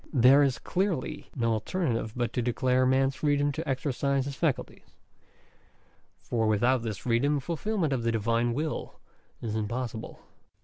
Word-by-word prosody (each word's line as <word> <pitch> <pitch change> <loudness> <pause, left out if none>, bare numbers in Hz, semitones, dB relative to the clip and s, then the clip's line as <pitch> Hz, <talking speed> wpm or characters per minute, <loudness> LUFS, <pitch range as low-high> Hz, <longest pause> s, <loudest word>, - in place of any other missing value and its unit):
There 135 +1 +6
is 135 -4 +2
clearly 175 -5 -2
no 115 -3 +1
alternative 115 - -1
but 120 -2 -1
to 125 - 0
declare 125 +2 +2
man's 135 +1 +3
freedom 145 -1 +2
to 155 +1 -5
exercise 135 0 0
his 140 -1 -5
faculties; 155 -5 -3 1.2
for 115 -2 -1
without 120 +4 +3
this 110 -3 -4
freedom 130 +6 +1
fulfilment 170 +2 -1
of 130 - -1
the 115 0 +1
Divine 115 +2 +1
will 155 +2 -3 0.5
is 110 -2 -2
impossible. 110 +1 -4
130 Hz, 140 wpm, -28 LUFS, 115-145 Hz, 1.2 s, There